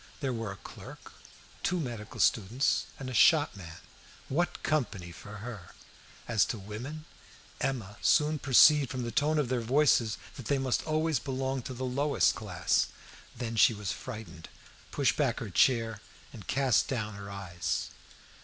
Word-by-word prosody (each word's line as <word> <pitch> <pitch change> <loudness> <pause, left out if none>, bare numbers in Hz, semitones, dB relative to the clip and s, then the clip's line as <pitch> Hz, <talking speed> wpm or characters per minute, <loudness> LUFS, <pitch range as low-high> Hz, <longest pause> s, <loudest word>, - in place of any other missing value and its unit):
There 135 -4 -1
were 115 -3 -4
a - - -7
clerk, - - -11 0.5
two 180 - 0
medical 120 -8 -6
students, 115 +6 +2
and 135 - -7
a 130 - -5
shopman 105 - +3 0.5
what 175 +6 -1
company 110 - -1
for 105 +4 -10
her! 110 -8 -9 0.5
As 110 -4 +3
to 115 - -4
the 100 - -11
women, 130 +10 -7 0.5
Emma 110 -6 -3
soon 150 0 +3
perceived 140 +1 +6
from 125 +2 -3
the 120 - -3
tone 150 +4 +2
of 145 -5 +1
their 125 -2 0
voices 120 -3 +3 0.2
that 130 - -8
they 140 - +2
must 130 -2 0
almost 155 -4 +1
belong 135 -1 -2
to 130 - -6
the 130 +2 -3
lowest 140 +3 +2
class. - - 0 0.5
Then 115 -2 -4
she 110 +1 +5
was 105 -1 -3
frightened, 100 -6 -8 0.4
pushed - - +1
back - - +1
her - - -6
chair, 115 -4 +2 0.3
and 110 - -11
cast 135 -2 +2
down 110 -5 -3
her 100 0 -8
eyes. 95 -3 -3
120 Hz, 160 wpm, -30 LUFS, 105-140 Hz, 0.5 s, perceived